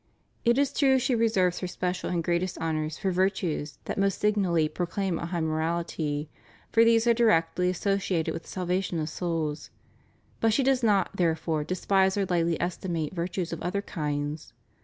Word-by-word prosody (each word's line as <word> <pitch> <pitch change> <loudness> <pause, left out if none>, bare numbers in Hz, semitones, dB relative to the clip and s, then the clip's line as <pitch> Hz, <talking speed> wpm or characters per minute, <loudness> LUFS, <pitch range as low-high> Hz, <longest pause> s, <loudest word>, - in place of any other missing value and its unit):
It 235 +1 +3
is 280 0 +2
true 270 -2 +4
she 260 0 +1
reserves 200 -6 +2
her 180 - -3
special 180 0 -3
and 175 -2 -1
greatest 175 +2 -1
honors 155 -1 -2
for 190 - -1
virtues 180 -5 -1
that - - -3
most 195 -1 +1
signally 190 -7 +2
pro 175 +3 -3
claim 185 -1 -2
a 170 - -4
high 170 -1 -2
morality, 160 -2 -1 0.4
for 230 - +5
these 230 0 +4
are 235 - +5
directly 180 -6 +2
associated 185 -2 0
with 165 - -5
the - - -16
salvation 180 -1 -1
of 155 0 -2
souls; 160 -3 -3 0.7
but 225 -1 +3
she 270 - +2
does 265 -1 +2
not, 205 -5 +2
therefore, 160 -2 0
despise 190 +3 +1
or 200 - +1
lightly 170 -2 +1
estimate 170 -3 -2
\'irtues 175 0 -3
of 165 - -6
other 200 +3 -2
kinds. 150 -2 -4
180 Hz, 175 wpm, -27 LUFS, 165-200 Hz, 0.7 s, for